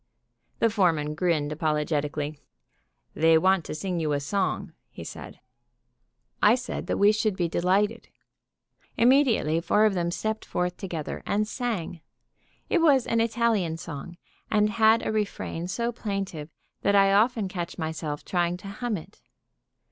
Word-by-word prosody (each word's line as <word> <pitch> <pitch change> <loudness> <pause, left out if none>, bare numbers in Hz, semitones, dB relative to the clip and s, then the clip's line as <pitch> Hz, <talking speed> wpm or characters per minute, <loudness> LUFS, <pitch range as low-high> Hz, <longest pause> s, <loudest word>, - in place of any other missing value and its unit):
The 230 - +2
foreman 165 -8 +1
grinned 155 -3 0
apologetically. 150 -1 -1 0.7
"They 160 0 +4
want 185 +1 +3
to - - -5
sing 180 +1 -3
you 155 -2 0
a 145 - +1
song," 185 +6 -2 0.2
he - - -10
said. - - -9 1.0
I 210 +3 +6
said 255 0 -5
that - - -1
we 205 +1 +6
should 215 -1 0
be 175 - +1
delighted. 195 +7 0 0.9
Immediately 235 - +3
four 205 +5 +3
of 215 - +3
them 170 -2 -1
stepped 220 +5 -3
forth 180 0 -2
together 170 -7 -5
and 210 +1 +1
sang. 215 -9 -3 0.7
It 345 - +2
was 280 -6 +4
an 230 0 +1
Italian 225 -8 +1
song, 165 +1 -8 0.3
and 210 0 +2
had 220 0 +4
a - - 0
refrain 200 -5 -3
so 235 +6 -1
plaintive 195 -9 -4 0.3
that 200 - +2
I 195 0 +5
often 220 0 +3
catch 180 -1 -5
myself 155 -3 -4
trying 175 -1 0
to 195 +2 -9
hum 225 +1 -3
it. 160 - -13
190 Hz, 150 wpm, -26 LUFS, 165-220 Hz, 1.0 s, I